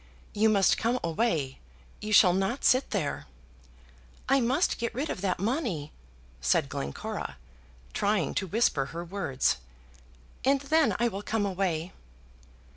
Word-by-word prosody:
"You 220 +1 +3
must 200 -3 +3
come 240 +3 +1
away! 165 - 0 0.4
You 215 - -4
shall 185 -4 +7
not 195 +8 -1
sit 255 +2 +4
there!" - - -2 1.0
"I 275 - +4
must 260 +9 +1
get 235 0 -3
rid 285 +5 -2
of - - -5
that 190 -2 0
money," 200 - -2 0.5
said 65 - +2
Glencora, 70 0 -5 0.6
trying 200 -8 +1
to 190 - -1
whisper 190 - +2
her 170 +4 -6
words, 170 - 0 0.9
"and 275 +1 +3
then 285 -6 +2
I 240 - +3
will 200 -3 -4
come 210 0 -1
away." 185 -3 -1
200 Hz, 135 wpm, -28 LUFS, 170-235 Hz, 1.0 s, shall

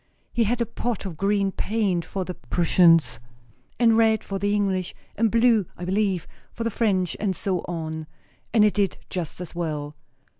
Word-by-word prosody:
He 235 - +2
had 240 +3 0
a - - +2
pot 230 -2 -3
of 180 -4 -5
green 195 +2 +1
paint 195 -5 -1
for 190 0 -4
the 180 - -4
Prussians, 165 -5 +3 0.6
and 230 -2 +5
red 220 -1 +3
for 195 -1 -4
the 200 +1 0
English, 190 -3 -1 0.2
and 225 +1 +2
blue, 230 -4 +3
I 175 - -5
believe, 190 -2 0 0.3
for 230 - -5
the 230 - -1
French, 190 -6 +1
and 195 -3 0
so 185 +1 -1
on; 160 -2 -4 0.4
and 215 -2 +5
it 210 - +3
did 200 -3 0
just 175 -4 -4
as 180 -2 -7
well." 150 -4 -3
195 Hz, 180 wpm, -24 LUFS, 175-220 Hz, 0.6 s, and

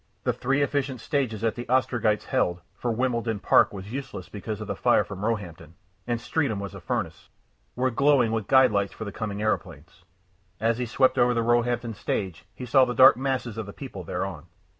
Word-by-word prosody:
The - - +1
three 135 +3 0
efficient 140 -2 -1
stages 125 -7 -2
that 115 -1 +1
the 120 - -7
Ostrogites 120 -4 +1
held 85 0 0
for 120 +5 -4
Wimbledon 115 -2 -1
Park 95 - +4
was 100 +1 -8
useless 140 +1 -6
because 105 +1 -6
of 105 - -5
the - - -4
fire - - +3
from 100 +1 -8
Roehampton, 85 -8 -4 0.3
and 120 -1 -1
Streatham 125 -4 -1
was 100 -2 -6
a - - -9
furnace - - -4 0.5
were 130 +1 +1
glowing 135 -2 +3
with 110 -3 -2
guide 130 -2 +6
lights 100 -1 0
for 110 - -7
the 100 - -5
coming 105 -1 -4
aeroplanes. 110 - -3 0.6
As 115 +3 +1
he 125 - -2
swept 130 +3 +2
over 120 0 +4
the 115 - +1
Roehampton 120 0 +1
stage 95 -4 -4
he 125 - -7
saw 130 +2 +5
the 125 -1 -1
dark 130 -2 +8
masses 125 -3 -2
of 110 - -5
the 100 - -8
people 125 -9 -8
thereon. 90 -2 -5
115 Hz, 200 wpm, -26 LUFS, 100-130 Hz, 0.6 s, dark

